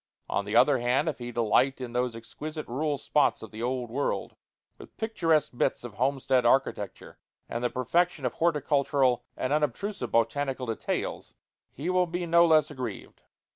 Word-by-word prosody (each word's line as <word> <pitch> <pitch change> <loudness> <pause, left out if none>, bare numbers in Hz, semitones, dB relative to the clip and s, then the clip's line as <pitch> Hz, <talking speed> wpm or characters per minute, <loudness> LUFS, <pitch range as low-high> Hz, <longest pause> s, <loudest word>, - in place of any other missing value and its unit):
On 100 - -1
the 105 +2 -3
other 130 +2 +5
hand, 125 +6 +1
if 150 -5 -2
he 120 0 -5
delight 120 +4 +2
in 125 -2 -6
those 125 -1 0
exquisite 150 +7 -7
rural 145 +4 -1
spots 145 -1 +1
of 110 - -9
the 110 +1 -8
Old 125 -1 -2
World 140 +3 -2 0.4
with - - -14
picturesque 165 -9 +1
bits - - 0
of 120 -3 -7
homestead 130 +1 +1
architecture 120 -5 0 0.3
and 115 +1 -4
the 120 - +2
perfection 160 +4 0
of 125 - 0
horticultural 140 -5 +1
and 130 - -1
unobtrusive 150 - -1
botanical 130 +3 0
details, 115 -2 -3 0.3
he 160 +7 -4
will 180 -1 +2
be 175 +1 -3
no 170 0 +5
less 155 -2 +4
aggrieved. 130 -3 -7
135 Hz, 165 wpm, -28 LUFS, 120-155 Hz, 0.4 s, other